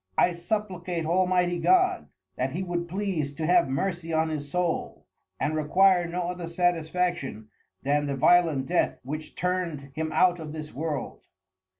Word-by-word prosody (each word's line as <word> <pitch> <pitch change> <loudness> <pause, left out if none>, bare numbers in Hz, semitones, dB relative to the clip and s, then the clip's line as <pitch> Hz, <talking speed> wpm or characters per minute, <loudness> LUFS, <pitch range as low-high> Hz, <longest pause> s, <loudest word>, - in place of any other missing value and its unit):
I 180 - +4
supplicate 175 -2 -3
Almighty 180 0 +2
God, 370 - +3 0.3
that - - -2
he 190 - -2
would 175 -1 -3
please 175 -6 -2
to 155 +2 -3
have 175 -2 +4
Mercy 165 +4 -2
on 160 0 +1
his 145 -2 -4
Soul, 180 +1 -2 0.3
and 155 - 0
require 175 +3 +4
no 175 +1 -2
other 175 -1 -4
satisfaction 170 -8 -1 0.3
than 145 +2 +1
the 140 - -1
violent 160 -1 +4
Death, 175 +4 +1
which 155 +4 -6
turn'd 170 -6 -2
him 155 +1 -3
out 175 +2 +3
of 155 -2 -7
this 155 -1 -7
World. 150 -1 -4
170 Hz, 155 wpm, -27 LUFS, 155-180 Hz, 0.3 s, I